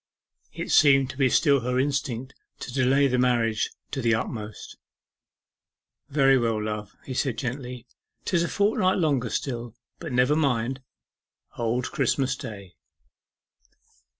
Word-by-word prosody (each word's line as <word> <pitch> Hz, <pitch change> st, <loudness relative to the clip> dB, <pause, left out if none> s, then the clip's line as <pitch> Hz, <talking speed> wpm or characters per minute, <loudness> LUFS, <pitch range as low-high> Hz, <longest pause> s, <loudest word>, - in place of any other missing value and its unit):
It -, -, -5 dB
seemed 135 Hz, -3 st, +5 dB
to -, -, -14 dB
be 135 Hz, -2 st, +4 dB
still 140 Hz, +1 st, +4 dB
her 125 Hz, +1 st, -1 dB
instinct 135 Hz, -2 st, -2 dB, 0.3 s
to 120 Hz, -, -6 dB
delay 135 Hz, +2 st, +3 dB
the 125 Hz, -2 st, +1 dB
marriage 115 Hz, -3 st, +1 dB, 0.2 s
to 135 Hz, -, -2 dB
the 115 Hz, -2 st, +3 dB
utmost. 110 Hz, -2 st, -6 dB, 1.3 s
'Very 135 Hz, -2 st, +4 dB
well, 115 Hz, -2 st, 0 dB
love,' 105 Hz, -1 st, -5 dB
he 130 Hz, -, -5 dB
said 130 Hz, -1 st, -1 dB
gently. 125 Hz, -1 st, -5 dB, 0.4 s
''Tis 175 Hz, -3 st, +1 dB
a 170 Hz, -, 0 dB
fortnight 200 Hz, -1 st, +2 dB
longer 140 Hz, -9 st, +1 dB
still; 120 Hz, -3 st, -4 dB, 0.2 s
but -, -, -6 dB
never 125 Hz, +4 st, +3 dB
mind. 135 Hz, -3 st, 0 dB, 0.7 s
Old 120 Hz, +2 st, -1 dB
Christmas 135 Hz, -3 st, 0 dB
Day. 100 Hz, -7 st, -9 dB
130 Hz, 130 wpm, -25 LUFS, 115-140 Hz, 1.3 s, seemed